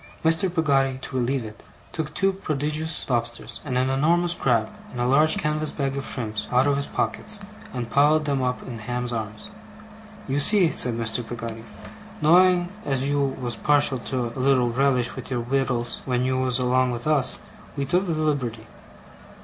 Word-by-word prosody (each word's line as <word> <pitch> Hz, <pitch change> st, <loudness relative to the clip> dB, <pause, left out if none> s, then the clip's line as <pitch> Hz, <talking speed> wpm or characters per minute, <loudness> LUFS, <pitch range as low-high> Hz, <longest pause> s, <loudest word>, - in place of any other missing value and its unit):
Mr. 165 Hz, +3 st, +3 dB
Peggotty, 135 Hz, -6 st, +1 dB
to 135 Hz, -, -6 dB
relieve 130 Hz, 0 st, 0 dB
it, 110 Hz, -1 st, -11 dB, 0.3 s
took 155 Hz, -2 st, -4 dB
two 195 Hz, 0 st, +2 dB
prodigious 155 Hz, -2 st, -3 dB
lobsters, 120 Hz, -2 st, -3 dB
and 125 Hz, -4 st, -2 dB
an 130 Hz, +1 st, +2 dB
enormous 170 Hz, +6 st, +3 dB
crab, 115 Hz, -8 st, +1 dB, 0.2 s
and 125 Hz, -, -7 dB
a 120 Hz, -, +1 dB
large 150 Hz, +5 st, +4 dB
canvas 150 Hz, 0 st, -1 dB
bag 135 Hz, -2 st, -2 dB
of 140 Hz, -, -4 dB
shrimps, 110 Hz, -4 st, -3 dB
out 125 Hz, +2 st, +4 dB
of 145 Hz, -1 st, +2 dB
his 140 Hz, 0 st, 0 dB
pockets, 215 Hz, -1 st, -2 dB, 0.3 s
and 120 Hz, -2 st, -5 dB
piled 150 Hz, +2 st, +4 dB
them 140 Hz, -2 st, 0 dB
up 125 Hz, 0 st, -2 dB
in 120 Hz, -3 st, -7 dB
Ham's 120 Hz, +2 st, -3 dB
arms. 110 Hz, -, -6 dB, 0.8 s
'You 135 Hz, +1 st, 0 dB
see,' 185 Hz, +3 st, +6 dB
said 125 Hz, -4 st, -1 dB
Mr. 115 Hz, +1 st, -1 dB
Peggotty, 115 Hz, -1 st, -7 dB, 0.6 s
'knowing 175 Hz, +2 st, +4 dB
as 135 Hz, -1 st, -1 dB
you 145 Hz, 0 st, +1 dB
was 130 Hz, -4 st, -2 dB
partial 145 Hz, -2 st, +2 dB
to 125 Hz, +1 st, -3 dB
a -, -, -6 dB
little 130 Hz, -2 st, +3 dB
relish 125 Hz, -1 st, +1 dB
with -, -, -8 dB
your 125 Hz, -2 st, -1 dB
wittles 125 Hz, -1 st, -1 dB
when 125 Hz, -1 st, 0 dB
you 130 Hz, 0 st, 0 dB
was 130 Hz, -1 st, +1 dB
along 130 Hz, 0 st, +2 dB
with 120 Hz, -1 st, -4 dB
us, 150 Hz, -4 st, +4 dB, 0.4 s
we 140 Hz, -, -1 dB
took 180 Hz, +7 st, +1 dB
the 170 Hz, -, 0 dB
liberty. 140 Hz, -8 st, -2 dB
135 Hz, 180 wpm, -24 LUFS, 125-150 Hz, 0.8 s, see